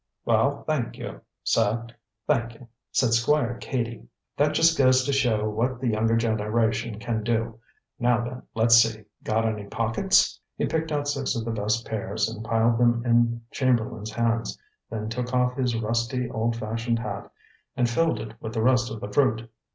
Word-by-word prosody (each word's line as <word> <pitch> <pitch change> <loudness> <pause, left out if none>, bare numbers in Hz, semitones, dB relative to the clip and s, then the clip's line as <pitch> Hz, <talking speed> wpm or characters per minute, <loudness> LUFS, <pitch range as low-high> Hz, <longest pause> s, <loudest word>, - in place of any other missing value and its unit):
"Well, - - +2
thank - - -2
you, - - -7 0.2
sir; 115 +1 +1 0.4
thank 120 -5 0
you," 120 +1 -15 0.2
said 120 -3 +2
Squire 120 0 +2
Cady. 115 - -3 0.3
"That 150 +1 +2
just 165 +1 +5
goes 130 -2 +4
to 140 - 0
show 115 -6 +2
what 120 +4 -1
the 125 -2 0
younger 115 +1 +2
generation 110 0 0
can 115 0 -2
do. 115 0 -1 0.4
Now 120 -1 +2
then, 125 +1 -6
let's 115 +1 +4
see. 115 -2 +3 0.2
Got 110 +1 +1
any 105 -2 -2
pockets?" 115 - +2 0.2
He - - 0
picked 160 0 -2
out 145 -1 -1
six 140 -2 -1
of 115 -1 -3
the 115 - -2
best 110 +2 -1
pears 110 0 -2
and 110 0 -6
piled 115 +1 +2
them 120 0 +3
in 115 -1 +2
Chamberlain's 115 -4 0
hands, 115 0 0 0.3
then 110 -1 -4
took 125 +2 -3
off 125 0 +2
his 125 -3 0
rusty, 115 +3 -1
old 115 +1 0
fashioned 115 +1 -2
hat 105 -3 -5 0.5
and 125 - +3
filled 120 +1 +1
it 110 0 -7
with 110 0 -6
the 110 - 0
rest 125 -1 +3
of 110 -1 -7
the 100 - -6
fruit. 115 -4 +1
115 Hz, 175 wpm, -25 LUFS, 110-125 Hz, 0.5 s, just